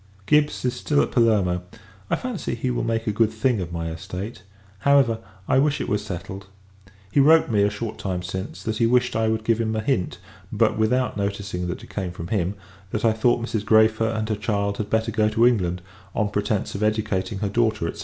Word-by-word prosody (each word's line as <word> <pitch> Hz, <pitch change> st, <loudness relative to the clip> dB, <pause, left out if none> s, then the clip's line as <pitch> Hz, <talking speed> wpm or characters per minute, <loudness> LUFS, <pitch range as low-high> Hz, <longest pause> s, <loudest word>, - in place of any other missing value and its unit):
Gibbs 150 Hz, +1 st, +2 dB
is 125 Hz, -, +1 dB
still 145 Hz, -1 st, 0 dB
at -, -, -4 dB
Palermo: 105 Hz, -7 st, +2 dB, 0.5 s
I -, -, +2 dB
fancy, 250 Hz, -, -4 dB
he 125 Hz, +2 st, -2 dB
will 120 Hz, -, -1 dB
make 115 Hz, -1 st, -1 dB
a 105 Hz, -, +1 dB
good 110 Hz, +1 st, +2 dB
thing 110 Hz, 0 st, +1 dB
of 85 Hz, -1 st, -5 dB
my 85 Hz, -1 st, -3 dB
estate; 90 Hz, +7 st, -6 dB, 0.4 s
however, 135 Hz, -2 st, +4 dB, 0.3 s
I 130 Hz, -, +4 dB
wish 145 Hz, +1 st, +2 dB
it -, -, -3 dB
was 105 Hz, 0 st, 0 dB
settled. 95 Hz, 0 st, -7 dB, 0.6 s
He 140 Hz, -, +3 dB
wrote 155 Hz, -1 st, +5 dB
me, 105 Hz, -2 st, +3 dB
a 100 Hz, -, +4 dB
short 105 Hz, +1 st, -5 dB
time 90 Hz, -2 st, -3 dB
since, 95 Hz, +3 st, -5 dB
that 110 Hz, -1 st, -2 dB
he 115 Hz, -, +3 dB
wished 125 Hz, +1 st, +2 dB
I 110 Hz, 0 st, +2 dB
would 110 Hz, 0 st, 0 dB
give 115 Hz, 0 st, +1 dB
him 110 Hz, -1 st, -1 dB
a -, -, 0 dB
hint 110 Hz, -5 st, -1 dB, 0.3 s
(but -, -, +2 dB
without 125 Hz, +2 st, +1 dB
noticing 100 Hz, -3 st, -3 dB
that 90 Hz, -, -5 dB
it -, -, -13 dB
came 95 Hz, -3 st, -3 dB
from 85 Hz, -1 st, -7 dB
him) 100 Hz, -2 st, 0 dB, 0.3 s
that 110 Hz, +3 st, -2 dB
I 110 Hz, -, +4 dB
thought 120 Hz, +1 st, +2 dB
Mrs. 110 Hz, -3 st, -2 dB
Græfer 110 Hz, +1 st, +4 dB
and 110 Hz, 0 st, -2 dB
her 110 Hz, -, +1 dB
child 100 Hz, -1 st, -1 dB
had 105 Hz, -1 st, -3 dB
better 110 Hz, +1 st, +1 dB
go 110 Hz, -1 st, +2 dB
to 115 Hz, +2 st, +3 dB
England; 90 Hz, -7 st, +1 dB, 0.3 s
on 105 Hz, -2 st, +1 dB
pretence 105 Hz, 0 st, -1 dB
of 100 Hz, -, -5 dB
educating 105 Hz, -2 st, 0 dB
her 100 Hz, +1 st, -2 dB
daughter, 110 Hz, -5 st, 0 dB
&c. -, -, -13 dB
110 Hz, 220 wpm, -24 LUFS, 100-115 Hz, 0.6 s, wrote